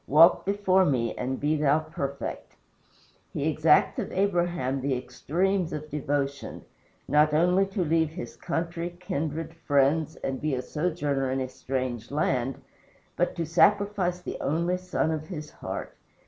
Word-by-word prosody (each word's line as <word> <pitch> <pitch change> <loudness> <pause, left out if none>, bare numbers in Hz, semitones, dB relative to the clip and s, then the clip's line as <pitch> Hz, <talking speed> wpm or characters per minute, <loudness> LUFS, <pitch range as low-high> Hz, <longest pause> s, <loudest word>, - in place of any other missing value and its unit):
Walk 160 +4 +6
before 195 -2 +3
me 125 -8 +1
and 130 +1 -3
be 150 +2 +1
thou 145 0 +3
perfect." 150 -3 -5 0.8
He 145 - -1
exacts 155 0 +3
of - - -3
Abraham 175 -8 0
the 135 -1 0
extremes 170 +9 -1
of 155 0 -6
devotion 140 -1 -2 0.4
not 150 0 +4
only 180 +4 +4
to 195 -1 -1
leave 160 0 +2
his 175 +3 -7
country, 170 0 -3
kindred, 160 -3 -3
friends, 155 0 +1
and 135 -1 -2
be 150 -3 0
a 125 - -3
sojourner 150 -4 -1
in 130 +1 0
a 130 - -2
strange 130 -2 -4
land, 135 -3 0 0.6
but 175 - 0
to 170 - -2
sacrifice 190 +1 +3
the - - -6
only 170 +5 0
son 180 -3 -1
of 155 -1 -3
his 155 -5 -7
heart. - - -6
155 Hz, 145 wpm, -27 LUFS, 140-175 Hz, 0.8 s, Walk